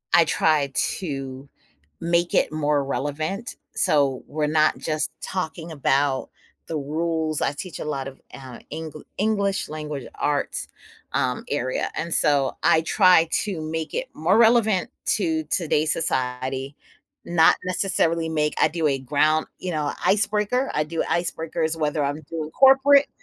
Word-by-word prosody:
I 170 - +6
try 150 -5 +1 0.3
to 135 -5 -6 0.6
make 170 +1 +1
it - - +2
more 150 -2 0
relevant, 155 - -3 0.2
so, 140 -3 +2
we're 150 0 -2
not 155 0 +2
just 155 -1 -1
talking 170 -2 -4
about 140 -2 0 0.4
the 160 - -3
rules 155 +1 -1
I - - +1
teach 175 +4 -7
a - - -5
lot 140 -3 -3
of, 135 - -12
uh, 130 -3 -10
Engl 155 -1 -7 0.2
English, 200 -2 0
Language 150 -3 -6
Arts, 145 -1 -1 0.4
um, 125 -1 -1
area, 130 -3 -2
and, 170 +1 -4
so 140 -2 +3
I 160 - +4
try 180 -1 +4 0.2
to 195 -6 -4
make 160 0 -4
it - - -3
more 180 +7 +2
relevant 220 -4 +3 0.3
to 160 -5 -1
today's 155 -1 +2
society, 130 -2 -2 0.5
not 165 -2 +4
necessarily 170 -3 +1
make 150 -1 0
I - - +5
do 160 0 -2
a 140 -2 +1
ground 150 +4 +1
you 185 - -4
know, 150 -2 -1
icebreaker, 210 +6 +2
I 150 - +1
do 160 +2 -2
icebreakers 165 -1 0
whether 150 -1 -1
I'm 145 +2 -3
doing 155 -2 -4
corporate 275 +1 +5
155 Hz, 145 wpm, -23 LUFS, 145-170 Hz, 0.6 s, I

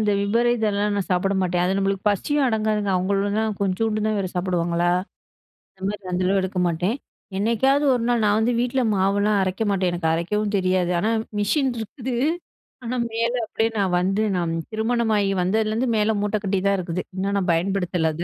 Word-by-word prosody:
இந்த 210 -1 +2
விபரீதெல்லாம் 210 -2 +1
நான் 195 - -2
சாப்பிட 195 +2 +1
மாட்டேன். 175 -1 0
அது 190 +2 +1
நம்மளுக்கு 195 +1 -1
பசியும் 280 +7 +1
அடங்காதுங்க. 215 -3 0
அவுங்களும் 200 +3 0
தான் 220 -1 -1
கொஞ்சோண்டு 215 +2 0
தான் 215 -1 0
வேற 190 -2 -1
சாப்பிடுவாங்களா! 175 -1 0 0.9
அந்தமாரி 195 +1 -4
அந்த 180 +1 0
அளவு 195 +1 +3
எடுக்க 185 0 -2
மாட்டேன். 175 +8 0 0.4
என்னைக்காவது 265 +7 +2
ஒரு 235 - -1
நாள் 240 -2 +2
நான் 210 +1 +3
வந்து 235 +2 +1
வீட்ல 250 +2 0
மாவெல்லாம் 200 +2 +2
அரைக்க 190 +4 -1
மாட்டேன். 185 -3 +1
எனக்கு 170 -2 -1
அரைக்கவும் 210 +5 -1
தெரியாது. 185 -1 +1
ஆனா, 220 +4 +1 0.3
மிஷின் 265 +6 +1
இருக்குது. 245 +3 -5 0.7
ஆனா, 240 +1 -3 0.2
மேல 230 +2 0
அப்பிடியே 225 +1 0
நான் 190 -3 +1
வந்து 195 +3 0
நான் 170 -2 -1 0.2
திருமணமாகி 220 -2 +1
வந்ததுலேருந்து 220 +6 0
மேல 215 +1 +2
மூட்ட 210 +1 0
கட்டி 195 -1 0
தான் 200 0 +2
இருக்குது. 180 0 -3
இன்னும் 200 +1 -1
நான் 185 - -2
பயன்படுத்தல, 180 -2 0
அத. 170 - -4
200 Hz, 170 wpm, -23 LUFS, 185-220 Hz, 0.9 s, அளவு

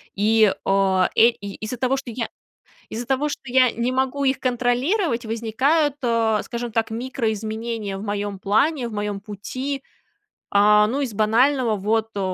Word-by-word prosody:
И, 215 0 +4
а, 195 -1 +2
э, 230 - +7
из-за 215 +2 -7
того, 255 +2 +1
что 265 -2 -7
я 230 0 -3 0.6
из-за 235 +2 -5
того, 275 +3 0
что - - -5
я 255 -1 +4
не 235 +2 -1
могу 265 +2 -1
их 265 -1 +1
контролировать, 250 - 0
возникают, 260 +7 +1
э, 230 -3 +1
скажем 240 -1 -5
так, 225 0 0
микроизменения 220 -3 -3
в 200 - -7
моём 205 -1 -3
плане, 240 +7 +1
в 230 - -8
моём 205 -1 -3
пути. 255 +7 -5 0.7
А, 210 +1 +5
ну, 255 +6 -2
из 255 -6 -3
банального: 230 +3 +2
вот, 220 +3 0
э, 200 - -3
230 Hz, 155 wpm, -22 LUFS, 210-255 Hz, 0.7 s, э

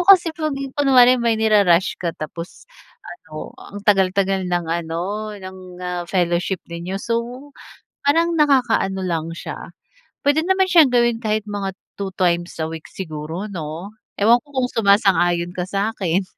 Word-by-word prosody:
mo - - +3
kasi 355 -4 +7
kung 310 -2 -1 0.2
kunwari 255 -3 +6
may 230 -1 +2
niru-rush 200 -5 +3
ka 170 -2 -1
tapos, 165 +3 -7 0.4
ano, 155 - -9
ang 205 0 -9
tagal-tagal 195 -1 +2
ng 175 -1 0
ano, 175 +6 -3
ng 190 -1 -9 0.3
ah, 180 -1 -3
fellowship 175 0 0
ninyo, 170 +3 -5
so 240 +5 -3 0.6
parang 330 +4 +3
nakaka-ano 250 -10 +2
lang 165 -3 -2
siya, 170 - -7 0.7
pwede 285 +2 +3
naman 380 0 +3
siyang 325 -5 +7
gawin 240 -2 +2
kahit 215 -2 -1
mga 200 -2 -4 0.2
2 195 -1 -3
times 175 -1 0
a - - -1
week 160 -1 -8
siguro 165 +3 -6
'no? 165 +2 -6 0.2
Ewan 230 +4 +5
ko 285 +1 -21
kung 250 -1 +1
sumasang-ayon 185 -5 +3
ka 180 0 -4
sa'kin? 195 -2 -1
195 Hz, 145 wpm, -21 LUFS, 175-240 Hz, 0.7 s, kasi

